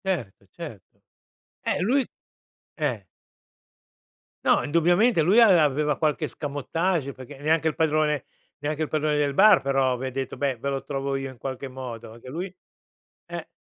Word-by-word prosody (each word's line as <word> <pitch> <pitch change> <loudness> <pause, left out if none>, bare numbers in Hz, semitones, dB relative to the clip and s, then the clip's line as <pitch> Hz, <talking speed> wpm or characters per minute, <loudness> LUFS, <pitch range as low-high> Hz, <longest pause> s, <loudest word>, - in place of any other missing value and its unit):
Certo 130 - -3
certo. 150 - -11 0.6
Eh, - - 0
lui 255 +7 +2 0.7
eh. 130 - -2 1.4
No, - - +4
indubbiamente, 175 +7 +3
lui 190 +9 +5
ave 205 -7 +7
aveva 150 -1 +2
qualch'escamotage 150 +1 -1
perché, 130 +2 -11
neanche 160 +2 +2
il 155 - 0
padrone 155 -3 +1 0.3
neanche 150 +2 -3
il - - -2
padrone 155 0 0
del 145 -2 +1
bar, 210 +1 +7
però, 135 -2 +2
vi 130 +2 -4
ha - - -4
detto: 130 0 -4
"Beh, 140 -3 -1
ve 140 +5 -3
lo 135 -1 -2
trovo 140 -1 -2
io 135 0 -3
in 130 - -12
qualche 135 +2 -5
modo", 125 -4 -8
anche 120 +2 -12
lui 175 +7 -4 0.8
eh. - - -7
145 Hz, 155 wpm, -25 LUFS, 135-160 Hz, 1.4 s, ave